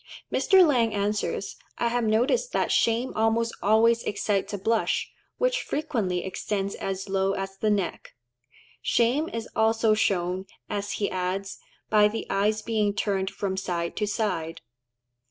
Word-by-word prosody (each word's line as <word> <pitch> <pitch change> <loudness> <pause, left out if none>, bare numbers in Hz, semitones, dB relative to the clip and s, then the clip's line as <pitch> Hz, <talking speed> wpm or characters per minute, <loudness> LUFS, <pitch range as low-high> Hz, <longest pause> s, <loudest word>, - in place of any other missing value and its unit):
Mr. 380 -2 +5
Lang 235 -8 +2
answers, 205 +1 -2 0.2
"I 235 - +1
have 240 0 0
noticed 245 - +1
that - - +1
shame 235 +3 +2
almost 225 +1 +1
always 230 +3 +4
excites 200 -2 -1
a 205 - -3
blush, 220 +3 0 0.3
which - - +1
frequently 225 - -2
extends 195 +1 -2
as 195 0 -4
low 195 0 +1
as 195 0 -4
the 215 - 0
neck." 200 -10 -2 0.7
Shame 255 +7 +2
is 230 0 -5
also 225 0 +3
shown, 185 -2 0 0.2
as 205 0 -3
he 205 - -1
adds, 185 +2 -3 0.3
"by 210 -1 +6
the 220 +2 -4
eyes 210 +2 +1
being 210 -3 0
turned 195 -2 0
from 195 -1 -3
side 175 -3 -2
to 210 - 0
side." 195 -6 -2
210 Hz, 145 wpm, -26 LUFS, 195-230 Hz, 0.7 s, by